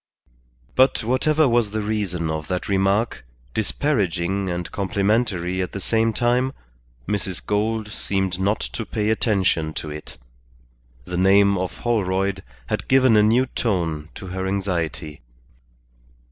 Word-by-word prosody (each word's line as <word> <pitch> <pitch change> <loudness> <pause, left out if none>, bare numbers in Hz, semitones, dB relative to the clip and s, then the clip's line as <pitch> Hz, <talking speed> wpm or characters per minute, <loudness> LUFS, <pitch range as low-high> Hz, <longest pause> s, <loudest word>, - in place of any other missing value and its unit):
But 130 -2 +3
whatever 150 +6 +2
was 120 -3 +2
the 110 +1 -2
reason 95 -6 -1
of 80 -1 -4
that 90 -1 -2
remark, 100 - +1 0.3
disparaging 100 - 0
and 85 0 -4
complimentary 100 -2 0
at 90 - -4
the 100 - -4
same 115 +3 +1
time, 125 +4 +1 0.5
Mrs. 100 -3 -2
Gould 110 +1 0
seemed 95 -3 -1
not 100 +3 +1
to 115 - -4
pay 105 +1 -1
attention 95 -8 +1
to 75 - -5
it. 75 -3 -9 0.9
The 90 - -4
name 100 +2 +5
of 95 -1 -3
Holroyd 95 -4 0 0.2
had - - -3
given 130 -3 +5
a 105 - +6
new 115 +5 +4
tone 85 -11 -2
to - - -8
her 95 +1 -3
anxiety. 85 -6 -2
100 Hz, 130 wpm, -23 LUFS, 90-110 Hz, 0.9 s, a